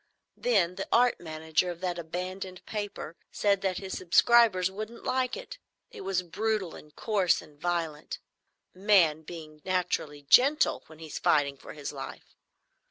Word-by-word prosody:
Then 185 -7 +1
the 195 - -4
art 245 +1 +4
manager 160 +1 -1
of 175 -1 -6
that 180 -2 -2
abandoned 185 +2 -5
paper 205 -6 -5 0.2
said 200 -2 +2
that 190 -2 0
his 190 -1 -5
subscribers 190 +1 +4
wouldn't 215 +4 -7
like 255 - 0
it. - - -9 0.3
It - - -9
was 190 -1 -1
brutal 195 +1 -1
and 150 0 -13
coarse 200 -5 +2
and 150 -1 -15
violent,—man 170 +1 0
being 155 -2 -10
naturally 175 -5 -1
gentle 275 - +4
when 160 - -14
he's 160 -1 -7
fighting 140 -2 +3
for - - -11
his 150 -1 -6
life. 135 -1 -9
180 Hz, 145 wpm, -29 LUFS, 160-205 Hz, 0.3 s, art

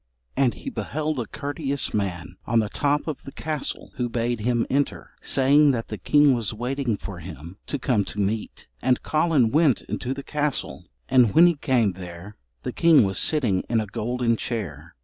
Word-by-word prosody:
And 130 -3 +2
he 270 - -7
beheld 155 - -3
a 115 - -3
courteous 140 -1 -3
man 90 -4 -3
on 115 - +2
the 110 -2 +2
top 145 +5 0
of 155 -3 -4
the 135 - -9
castle 150 -1 -4
who 125 -1 -1
bade 120 0 -1
him 120 +1 +1
enter, 140 +1 -1
saying 145 +2 +4
that 115 -2 -3
the 110 - -4
king 145 +6 +4
was 115 -3 -1
waiting 125 -1 -2
for 100 -3 -8
him 85 +1 -10
to 145 - -2
come 120 -6 +1
to 105 - -7
meat. 105 +2 -3
And 125 -1 +1
Collen 155 -7 +2
went 150 -4 +3
into 130 +2 -4
the 140 - -7
castle, 150 -2 -2 0.2
and 125 -5 +4
when 170 - +8
he 175 - +5
came 125 -8 +1
there 90 +2 -10 0.3
the - - -4
king 165 -6 +5
was 95 -2 +1
sitting 120 -12 +2
in 115 -1 +2
a 110 - -1
golden 115 +3 -1
chair. 85 - -5
120 Hz, 190 wpm, -24 LUFS, 105-145 Hz, 0.3 s, when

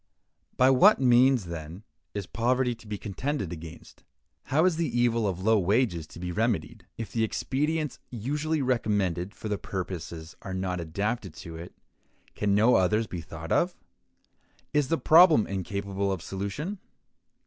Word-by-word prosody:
By 130 +1 +6
what 195 +12 +6
means, 125 -3 +4
then, 85 +3 -7 0.3
is 100 -2 -3
poverty 125 +3 +1
to 115 -1 -15
be 105 -1 -4
contended 105 - -3
against? 80 0 -11 0.4
How 155 +5 +2
is 185 -3 +3
the 160 -7 -1
evil 115 -2 +2
of 95 -1 -3
low 110 0 +4
wages 95 -4 +1
to - - -12
be 90 0 -4
remedied? 110 +4 -1
If 110 -4 -6
the 115 +1 0
expedients 150 +6 -1
usually 145 +6 -2
recommended 105 -7 0
for - - -7
the 105 -2 -2
purpose 85 -3 -6
are 95 -1 -5
not 95 -1 -2
adapted 100 +2 -3
to 85 -1 -8
it, 85 +2 -9 0.6
can 100 -1 +1
no 110 +4 +5
others 105 +5 +2
be 90 -5 -6
thought - - -9
of? - - +2 1.0
Is 150 -2 +2
the 165 - +1
problem 160 - +6
incapable 100 +1 -3
of 90 -3 -3
solution? 100 - -4
105 Hz, 155 wpm, -27 LUFS, 95-130 Hz, 1.0 s, By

